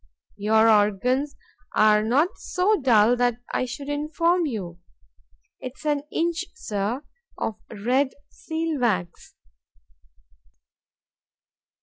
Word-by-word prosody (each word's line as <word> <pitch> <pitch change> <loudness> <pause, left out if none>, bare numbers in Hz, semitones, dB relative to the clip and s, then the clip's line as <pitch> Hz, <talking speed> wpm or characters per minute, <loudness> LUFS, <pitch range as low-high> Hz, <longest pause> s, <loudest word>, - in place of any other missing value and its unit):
—Your 220 +2 +3
organs 225 +7 +2 0.4
are 215 0 +5
not 265 +10 +2
so 390 +4 +1
dull 235 -2 +5
that 245 -1 +2 0.2
I - - +1
should 275 +3 -7
inform 315 +4 +1
you—'tis 170 - -10
an 295 -2 +1
inch, 335 0 0
Sir, 210 +6 -3 0.3
of 220 - -3
red 250 +6 +1 0.2
seal 320 -2 -3
wax. 185 -8 -2
245 Hz, 90 wpm, -24 LUFS, 210-295 Hz, 0.4 s, are